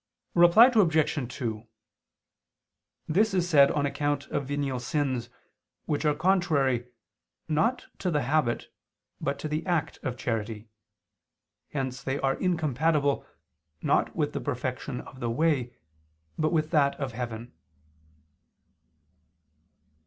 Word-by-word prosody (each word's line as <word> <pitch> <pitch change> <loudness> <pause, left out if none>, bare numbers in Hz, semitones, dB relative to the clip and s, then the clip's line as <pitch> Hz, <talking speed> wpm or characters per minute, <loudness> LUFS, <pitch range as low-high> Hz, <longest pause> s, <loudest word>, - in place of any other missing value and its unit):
Reply 175 +6 +8
Obj. 160 - +2
2: 115 -2 -4 1.4
This 195 +5 +2
is 180 -1 +1
said 140 -5 +6
on 145 -1 0
account 145 0 -1
of 140 - -2
venial 140 -2 -2
sins, 130 -2 -1 0.6
which 150 +1 -1
are 150 -1 +3
contrary, 150 -8 +2 0.6
not 215 +11 +1
to 185 - -1
the 150 -5 +1
habit, 135 -2 0 0.5
but 140 +1 -2
to - - -4
the 155 +1 -2
act 175 -4 -1
of 130 -3 -4
charity: 110 -2 -3 1.0
hence 130 -2 -3
they 135 +1 -2
are 135 0 +1
incompatible, 155 -4 +1 0.6
not - - +1
with - - -1
the - - -3
perfection - - -3
of 130 - -13
the 120 - -2
way, 130 -1 +1 0.6
but 155 0 0
with 155 -2 0
that 140 -4 +3
of 135 -2 -3
heaven. 120 0 -6
145 Hz, 120 wpm, -27 LUFS, 125-160 Hz, 1.4 s, Reply